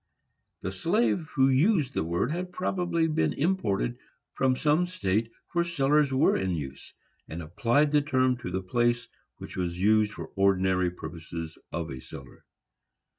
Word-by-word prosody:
The 95 - -3
slave 170 - +1
who 135 -2 +5
used 140 - +3
the - - 0
word 85 - -1
had 180 +2 -3
probably 175 -3 0
been 80 - +1
imported 140 - 0 0.3
from 130 -1 +2
some 155 +6 +2
state 115 - -1 0.2
where 170 -2 +2
cellars 150 -3 +2
were 135 +2 +3
in 95 -2 0
use, 70 -3 -7 0.4
and 80 - -5
applied 115 - +1
the 150 0 +4
term 130 -3 +2
to 120 - -6
the 95 +1 -3
place 120 +4 +1 0.3
which - - -9
was 90 -1 -3
used 105 +2 +3
for - - -6
the 95 - -3
ordinary 95 -2 +3
purposes 80 -1 -7 0.2
of 85 -3 -4
a 65 - -6
cellar. 70 +1 -12
120 Hz, 160 wpm, -28 LUFS, 90-150 Hz, 0.4 s, who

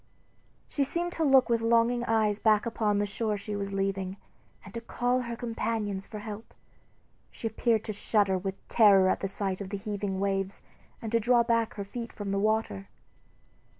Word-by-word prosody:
She 285 - 0
seemed 345 +5 -2
to 325 - -2
look 270 -3 +5
with 230 -2 +1
longing 235 +1 +3
eyes 215 -2 +2
back 215 0 +3
upon 215 -3 0
the 205 - +1
shore 210 +1 -2
she 205 +1 -5
was 200 -1 -3
leaving, 195 -1 -2 0.5
and 195 - -11
to 230 - -5
call 245 +2 0
to - - -3
her 235 0 -4
companions 225 -4 -3
for 215 - -7
help. 210 +1 -8 0.7
She - - -10
appeared 225 0 +1
to 215 - -4
shudder 200 -1 +1
with 190 +1 -5
terror 195 -4 +6
at - - +1
the 195 - -2
sight 195 0 -2
of 195 - -5
the 200 - -3
heaving 200 -1 -3
waves, 195 0 -1 0.4
and 220 - -4
to 230 - +3
draw 240 +1 +4
back 230 -1 +1
her 200 - -4
feet 230 +4 -6
from 205 -2 -5
the 195 - 0
water. 210 - 0
215 Hz, 190 wpm, -29 LUFS, 195-230 Hz, 0.7 s, terror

